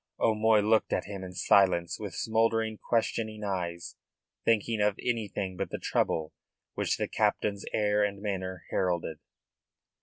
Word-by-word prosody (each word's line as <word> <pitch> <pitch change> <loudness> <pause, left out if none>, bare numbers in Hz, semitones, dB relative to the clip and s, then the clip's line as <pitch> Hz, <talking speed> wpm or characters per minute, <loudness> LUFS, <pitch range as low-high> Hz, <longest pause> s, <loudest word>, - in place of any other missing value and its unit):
O'Moy 110 -1 +4
looked 110 +1 +2
at - - 0
him 100 -1 -6
in 90 -1 -7
silence 90 -2 +3
with 105 -3 -6
smouldering, 110 -1 +1
questioning 110 -2 -1
eyes, 90 -4 -3 0.5
thinking 115 -1 +2
of 105 -1 +2
anything 105 -5 -2
but - - -3
the - - -4
trouble 80 -1 0 0.4
which - - 0
the - - -1
captain's 100 -1 0
air 105 0 +2
and 100 -1 -1
manner 95 -3 -4
heralded. 85 -4 -1
105 Hz, 140 wpm, -29 LUFS, 95-110 Hz, 0.5 s, O'Moy